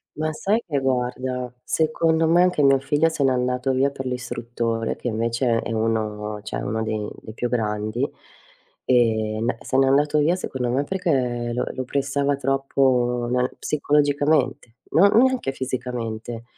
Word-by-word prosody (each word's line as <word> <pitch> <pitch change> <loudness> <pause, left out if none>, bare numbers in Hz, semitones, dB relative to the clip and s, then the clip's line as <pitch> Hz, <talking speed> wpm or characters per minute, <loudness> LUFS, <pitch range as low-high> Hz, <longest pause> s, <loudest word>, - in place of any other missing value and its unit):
Ma, 155 +1 -1
sai 210 +8 0
che 145 -3 -1
guarda, 125 -1 -1
secondo 160 +1 +1
me 170 +2 +5
anche 180 -4 +2
mio 135 -1 +5
figlio 145 +4 +2
se 160 -3 -1
n'è 135 - +4
andato 125 +1 0
via 135 +2 +2
per 135 -1 -7
l'istruttore, 120 -2 -3
che - - -5
invece 115 +1 0
è - - -5
uno 105 -2 -2
cioè - - -4
uno 110 +2 -2
dei 110 -1 -2
dei 110 - -10
più 120 - -2
grandi. 110 +1 -1 0.8
E 110 -3 +2
n 115 0 0
se 130 - -1
n'è 135 0 +4
andato 145 +2 +3
via, 165 +4 +3
secondo 130 -8 -3
me, 135 +4 +1
perché 130 -10 -1
lo 125 - -1
lo 130 - -4
pressava 140 +1 0
troppo 130 -3 +1
nel 125 0 0
psicologicamente, 145 -4 +1
non 200 +5 +5
neanche 255 - +3
fisicamente, 120 -3 -4
125 Hz, 155 wpm, -23 LUFS, 115-145 Hz, 0.8 s, me